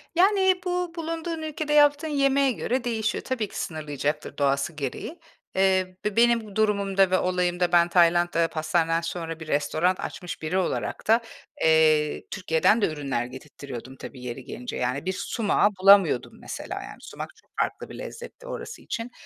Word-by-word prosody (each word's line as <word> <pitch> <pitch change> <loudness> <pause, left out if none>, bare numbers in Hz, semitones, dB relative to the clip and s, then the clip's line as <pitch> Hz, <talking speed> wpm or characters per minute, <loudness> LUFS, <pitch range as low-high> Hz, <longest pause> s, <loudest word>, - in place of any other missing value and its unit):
Yani, 380 0 +4
bu 360 -1 -1
bulunduğun 330 0 -4
ülkede 310 -1 -3
yaptığın 290 +1 +5
yemeğe 275 -2 +2
göre 250 +1 -2
değişiyor. 225 -2 -1
Tabii 240 -5 -2
ki, - - -5
sınırlayacaktır 150 -1 -3
doğası 140 +3 +1
gereği. 150 - -5 0.4
Eee, 185 -1 +2
be 210 -1 -1
benim 235 0 +4
bu 210 -3 -12
durumumda 200 -3 +2
ve 185 - +4
olayımda 180 -1 0
ben 170 0 +5
Tayland'da 175 -1 +3
pastaneden 165 +1 0
sonra 165 -1 -5
bir 160 - -9
restoran 155 +5 +1
açmış 180 -1 -6
biri 160 +4 -1
olarak 185 - -2
da, 225 +2 +5 0.4
eee, 155 -1 +3
Türkiye'den 190 +4 +2
de - - +4
ürünler 140 -6 -2
getirttiriyordum, 130 -1 -9
tabii 130 -1 -10
yeri 125 +1 -6
gelince. 125 0 -6
Yani 125 +5 -2
bir 190 - 0
sumağı 205 +2 +1
bulamıyordum 195 +1 +5
mesela, - - -6
yani, - - -10
sumak - - -8
çok - - -27
farklı - - -3
bir - - -9
lezzetti - - -9
orası 470 - -7
için. 230 +2 -5
185 Hz, 160 wpm, -25 LUFS, 160-245 Hz, 0.4 s, yaptığın